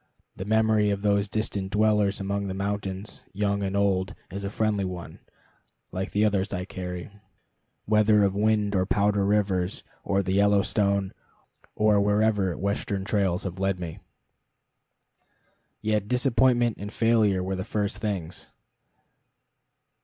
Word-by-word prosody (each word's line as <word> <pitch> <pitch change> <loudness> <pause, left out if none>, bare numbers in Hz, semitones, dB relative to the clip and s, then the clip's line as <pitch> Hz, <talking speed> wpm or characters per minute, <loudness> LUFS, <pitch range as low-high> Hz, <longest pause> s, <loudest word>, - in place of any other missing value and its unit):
The 95 - -6
memory 110 -1 +3
of 100 0 -2
those 100 -1 +2
distant 100 -3 -2
dwellers 105 -1 +2
among 100 0 -2
the 95 - -4
mountains, 100 0 -4
young 100 0 0
and 100 0 -1
old, 95 -2 +1 0.2
is 100 +2 -5
a 100 - -2
friendly 105 -1 0
one, 90 -2 -6 0.7
like 95 +2 -3
the 105 +1 +2
others 100 -2 0
I 90 -2 -3
carry, 90 -1 -6 0.7
whether 105 0 +4
of 100 -1 +2
Wind 105 0 +1
or 95 -2 +1
Powder 100 0 +2
Rivers, 95 -2 0 0.2
or 100 0 +1
the 95 - -1
Yellowstone, 100 -1 +2 0.6
or 105 -1 +3
wherever 105 -3 +2
Western 100 0 -2
trails 100 -4 0
have 95 -1 -5
led 95 -1 0
me. 85 -3 -6 1.8
Yet 105 -2 0
disappointment 125 -1 +2
and 105 +1 -6
failure 110 -5 +2
were 95 +1 -2
the 95 - -3
first 105 -1 -2
things. 95 -6 -4
100 Hz, 135 wpm, -26 LUFS, 95-105 Hz, 1.8 s, whether